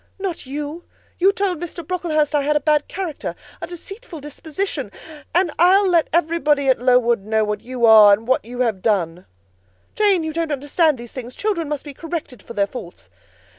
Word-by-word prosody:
"Not 380 -8 -5
you. 295 +4 -5 0.4
You 380 +3 +5
told 390 -4 -1
Mr. 340 -1 -7
Brocklehurst 320 -5 0
I 295 - +3
had 300 +2 0
a - - +4
bad 300 0 +1
character, 355 -6 -5 0.3
a - - -4
deceitful 375 +1 -9
disposition; 295 - -4 0.4
and 355 -2 +3
I'll 380 +3 +5
let 340 -4 +3
everybody 305 -4 +2
at 260 - +3
Lowood 245 -2 +3
know 215 +2 0
what 210 0 -2
you 250 -1 -1
are, 215 -2 +9
and 215 +3 +2
what 260 - +2
you 245 +2 -5
have 220 -6 0
done." 180 -5 -1 0.7
"Jane, 400 -5 +3
you 315 0 -3
don't 330 -1 -2
understand 290 +2 +1
these 235 -1 -10
things: 250 -1 -7
children 360 -8 -1
must 295 -1 -4
be 290 - -8
corrected 305 - -6
for 235 - -10
their 200 - +2
faults." 175 - -10
295 Hz, 185 wpm, -21 LUFS, 240-340 Hz, 0.7 s, are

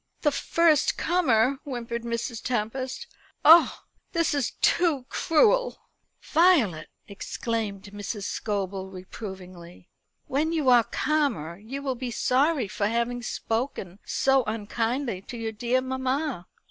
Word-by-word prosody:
"The 295 - +3
first 320 0 +2
comer!" 270 -7 +2
whimpered 235 -4 -4
Mrs. 235 0 -4
Tempest. 255 - -3 0.4
"Oh, 325 +3 +7 0.3
this 335 -3 +1
it 280 -5 0
too 310 -8 +2
cruel!" - - +2 0.5
"Violet!" 285 - +3 0.2
exclaimed 205 0 -4
Mrs. 205 0 -5
Scobel 195 -2 -3
reprovingly, 185 -2 -10 0.4
"when 305 +5 0
you 300 -5 +2
are 240 -2 +6
calmer 235 - -1
you 265 +7 -7
will 270 -2 -1
be 250 0 -5
sorry 265 +2 +1
for 200 +1 -1
having 235 +2 -1
spoken 225 -6 -3
so 270 -1 +2
unkindly 225 +1 -2
to 240 - -9
your 225 -1 -3
dear 240 +3 0
mamma." 260 - -2
240 Hz, 120 wpm, -26 LUFS, 210-280 Hz, 0.5 s, Oh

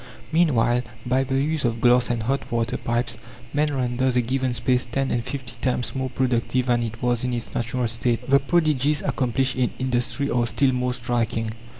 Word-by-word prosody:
Meanwhile, 125 -8 +3 0.2
by 130 +2 +2
the 135 0 -2
use 155 +1 0
of 115 -2 0
glass 125 +1 +4
and 120 -2 -1
hot 135 +4 -2
water 115 0 0
pipes, 120 0 -2 0.3
man 150 +1 +2
renders 130 -1 0
a - - +4
given 130 +1 -1
space 125 +2 +1
ten 135 +3 -2
and 120 - 0
fifty 130 -1 -5
times 125 -3 -1
more 130 0 -2
productive 125 0 0
than 120 -1 +2
it 115 0 -5
was 120 -1 +1
in 125 -1 -1
its 120 - -5
natural 120 +1 -1
state. 115 +1 -1
The 140 +1 +5
prodigies 150 -1 +1
accomplished 130 +1 0
in 125 -2 +1
industry 130 +2 -1
are 120 -1 +1
still 130 +3 +2
more 125 0 0
striking. 115 -2 -1
125 Hz, 190 wpm, -24 LUFS, 120-130 Hz, 0.3 s, The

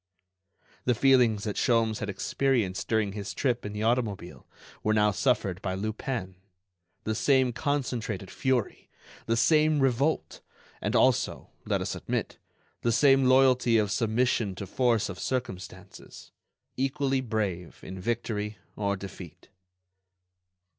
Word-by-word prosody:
The 125 - +2
feelings 120 -5 +4
that 105 -2 -3
Sholmes 115 -2 +2
had 105 - -4
experienced 105 -3 0
during 110 -3 +1
his 100 -1 -6
trip 120 -5 0
in - - -6
the 105 +1 -4
automobile 110 -6 -1 0.3
were 110 0 +1
now 105 -1 +4
suffered 100 -5 0
by 95 -2 -2
Lupin, 105 -1 -4 0.7
the 110 - -1
same 130 +1 +2
concentrated 120 - -2
fury, 130 -5 -1 0.4
the 115 0 +1
same 155 +4 +4
revolt, 135 +3 0 0.4
and - - -1
also, - - +2 0.2
let - - 0
us - - -2
admit, - - -3 0.4
the 120 - +1
same 135 +3 +5
loyalty 130 -2 +4
of 105 -2 +1
submission 110 -1 +1
to 100 - -6
force 120 +2 +1
of 90 -2 -7
circumstances. 120 -8 -6 0.4
Equally 135 0 0
brave 105 -8 -3
in 95 0 -7
victory 105 -1 -2 0.2
or 100 -1 -1
defeat. 95 -4 -10
115 Hz, 125 wpm, -28 LUFS, 100-130 Hz, 0.7 s, same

